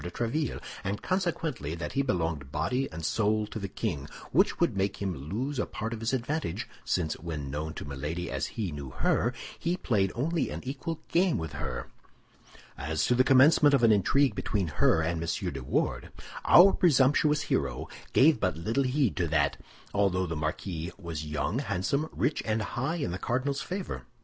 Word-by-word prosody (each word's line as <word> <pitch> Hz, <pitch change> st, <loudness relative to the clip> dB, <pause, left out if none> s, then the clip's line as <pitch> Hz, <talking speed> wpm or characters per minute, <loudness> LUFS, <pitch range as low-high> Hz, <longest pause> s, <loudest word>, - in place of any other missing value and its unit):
de 90 Hz, -, -4 dB
Tréville, 120 Hz, -, -2 dB, 0.2 s
and 100 Hz, +2 st, -3 dB
consequently, 165 Hz, -, -1 dB
that 85 Hz, -, -5 dB
he 140 Hz, -, +1 dB
belonged 80 Hz, -, -1 dB
body 100 Hz, -, 0 dB
and 80 Hz, 0 st, -6 dB
soul 110 Hz, +3 st, +1 dB
to 110 Hz, -, -6 dB
the 100 Hz, -, -3 dB
king; 70 Hz, -5 st, -3 dB, 0.2 s
which -, -, +3 dB
would -, -, +2 dB
make 100 Hz, 0 st, -1 dB
him 95 Hz, -2 st, -1 dB, 0.2 s
lose 130 Hz, +7 st, -2 dB
a -, -, +1 dB
part 110 Hz, +2 st, -4 dB
of 115 Hz, -, -5 dB
his 115 Hz, +1 st, -1 dB
advantage, 130 Hz, -, -2 dB, 0.2 s
since 80 Hz, -4 st, 0 dB
when 75 Hz, -5 st, -5 dB
known 75 Hz, +2 st, -4 dB
to -, -, -6 dB
Milady 75 Hz, +5 st, -4 dB
as -, -, -1 dB
he 105 Hz, -6 st, -1 dB
knew 70 Hz, -2 st, -6 dB
her, -, -, +1 dB, 0.3 s
he 175 Hz, +2 st, 0 dB
played 100 Hz, -, +1 dB
only 160 Hz, +6 st, 0 dB
an -, -, -5 dB
equal 145 Hz, +5 st, -4 dB
game 180 Hz, 0 st, +3 dB
with 80 Hz, -2 st, -5 dB
her. -, -, -4 dB, 0.9 s
As 75 Hz, +2 st, -1 dB
to -, -, +3 dB
the 125 Hz, +1 st, +5 dB
commencement 140 Hz, +2 st, +6 dB
of 120 Hz, -, +1 dB
an 115 Hz, -, +7 dB
intrigue 135 Hz, +8 st, +3 dB
between 95 Hz, -6 st, -1 dB
her 80 Hz, +2 st, +3 dB
and 80 Hz, 0 st, -1 dB
M. 85 Hz, -3 st, -2 dB
de 70 Hz, -, -5 dB
Wardes, -, -, -1 dB, 0.4 s
our 190 Hz, +3 st, +8 dB
presumptuous 150 Hz, -1 st, +4 dB
hero -, -, -1 dB, 0.2 s
gave 150 Hz, +4 st, +5 dB
but 90 Hz, -4 st, 0 dB
little 115 Hz, +11 st, 0 dB
heed 130 Hz, -2 st, +1 dB
to 85 Hz, -3 st, +1 dB
that, 75 Hz, -2 st, +2 dB, 0.4 s
although 95 Hz, -2 st, +2 dB
the 80 Hz, -2 st, -3 dB
marquis 80 Hz, +3 st, -3 dB
was 80 Hz, -5 st, -5 dB
young, 75 Hz, -, -1 dB
handsome, 140 Hz, -, -1 dB
rich, 150 Hz, -, 0 dB
and 110 Hz, 0 st, 0 dB
high 130 Hz, +10 st, -2 dB
in 145 Hz, -, -2 dB
the 90 Hz, -, -4 dB
cardinal's 130 Hz, +7 st, -1 dB
favor. 185 Hz, 0 st, -5 dB
105 Hz, 185 wpm, -29 LUFS, -, 0.9 s, our